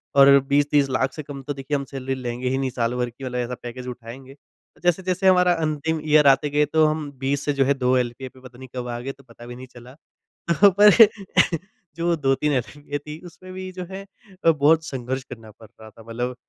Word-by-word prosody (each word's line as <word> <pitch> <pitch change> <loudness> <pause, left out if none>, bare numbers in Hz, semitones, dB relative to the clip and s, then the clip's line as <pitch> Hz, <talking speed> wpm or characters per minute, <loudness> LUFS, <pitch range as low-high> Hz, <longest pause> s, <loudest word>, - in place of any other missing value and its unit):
और 140 0 +7
20-30 145 0 +2
लाख 130 0 0
से 155 - -7
कम 140 -1 -8
तो 145 - -4
देखिए 140 +1 -3
हम 140 - -4
सैलरी 135 0 -5
लेंगे 125 0 -4
ही 130 - -1
नहीं 135 -1 -1
साल 120 -2 -2
भर 125 -1 -1
की 120 +3 -14
वाला 125 -1 -4
ऐसा 125 0 -3
पैकेज 125 +1 -7
उठाएँगे। 125 +2 -10 0.5
जैसे-जैसे 185 +2 +1
हमारा 180 -1 +5
अंतिम 155 +1 -2
ईयर 150 -1 +5
आते 140 +2 +4
गए 150 +1 +2
तो 155 +2 +2
हम 155 -1 -2
20 140 +2 -1
से 145 - 0
जो 135 -1 +1
है 140 - +3
2 130 -1 +1
एलपीए 125 +1 -3
पे 130 - -19
पता 125 -1 -14
नहीं 130 +1 -11
कब 125 -1 -4
आ 120 0 -4
गए, 130 +3 -5
तो 140 0 -19
पता 120 -1 -15
भी 120 0 -9
नहीं 130 +1 -11
चला। 125 0 -14 0.6
तो 180 +5 +6
पर 210 0 +9 1.0
जो 170 +1 -2
वो 170 - +2
2-3 145 0 0
एलपीए 145 +3 -4
थी 150 +1 -9
उसमें 185 +1 -12
भी 185 0 -7
जो 180 0 -7
है 195 +1 -7 0.4
अ, 165 - +7
बहुत 155 +1 +3
संघर्ष 130 -2 -4
करना 110 -3 -12
पड़ 110 +1 -17
रहा 110 - -11
था 110 +1 -17
मतलब 120 +2 -4
135 Hz, 230 wpm, -23 LUFS, 125-150 Hz, 1.0 s, पर